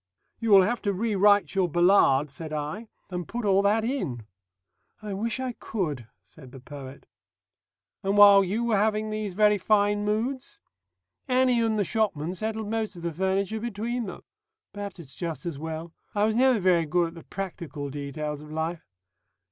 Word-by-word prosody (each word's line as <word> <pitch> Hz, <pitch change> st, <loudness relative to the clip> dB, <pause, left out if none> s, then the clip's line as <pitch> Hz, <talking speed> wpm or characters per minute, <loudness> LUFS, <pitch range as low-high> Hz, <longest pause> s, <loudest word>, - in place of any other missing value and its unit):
"You 230 Hz, -, -2 dB
will 195 Hz, -2 st, +8 dB
have 235 Hz, +5 st, -1 dB
to 200 Hz, -, 0 dB
rewrite 205 Hz, 0 st, +3 dB
your 190 Hz, -3 st, +1 dB
Ballade," 160 Hz, -5 st, +4 dB
said 155 Hz, +3 st, -7 dB
I, 155 Hz, +9 st, -4 dB, 0.2 s
"and 180 Hz, -1 st, -4 dB
put 235 Hz, -1 st, -4 dB
all 195 Hz, -1 st, +4 dB
that 210 Hz, +2 st, +2 dB
in." 145 Hz, -, -3 dB, 0.7 s
"I 210 Hz, -2 st, -6 dB
wish 225 Hz, +5 st, -2 dB
I 260 Hz, -1 st, -2 dB
could," 155 Hz, -, -4 dB, 0.2 s
said 130 Hz, -5 st, -15 dB
the 135 Hz, -, -11 dB
poet. 135 Hz, 0 st, -10 dB, 1.0 s
"And 195 Hz, +1 st, 0 dB
while 200 Hz, -1 st, +9 dB
you 205 Hz, +5 st, -1 dB
were 230 Hz, -3 st, +2 dB
having 215 Hz, +1 st, +1 dB
these 215 Hz, -3 st, -4 dB
very 210 Hz, 0 st, +4 dB
fine 205 Hz, +1 st, +2 dB
moods?" 230 Hz, +6 st, -2 dB, 0.7 s
"Annie 255 Hz, -2 st, +3 dB
and 225 Hz, -1 st, +1 dB
the 205 Hz, -, +1 dB
shopman 180 Hz, -6 st, -1 dB
settled 220 Hz, +2 st, -4 dB
most 220 Hz, -3 st, -2 dB
of 170 Hz, -, -10 dB
the 170 Hz, -, -1 dB
furniture 190 Hz, +5 st, -1 dB
between 235 Hz, +1 st, -3 dB
them. -, -, -8 dB, 0.5 s
Perhaps 205 Hz, -1 st, -6 dB
it's 140 Hz, -5 st, -11 dB
just 170 Hz, 0 st, -5 dB
as 165 Hz, -5 st, -4 dB
well. 160 Hz, +1 st, -6 dB, 0.2 s
I 205 Hz, -, +2 dB
was 220 Hz, -, +1 dB
never 255 Hz, +1 st, +4 dB
very 175 Hz, -4 st, +3 dB
good 170 Hz, +2 st, +1 dB
at -, -, -14 dB
the 165 Hz, -, -11 dB
practical 170 Hz, -7 st, -6 dB
details 145 Hz, +1 st, -5 dB
of 150 Hz, 0 st, -12 dB
life.... 160 Hz, +1 st, -3 dB
195 Hz, 175 wpm, -26 LUFS, 165-215 Hz, 1.0 s, while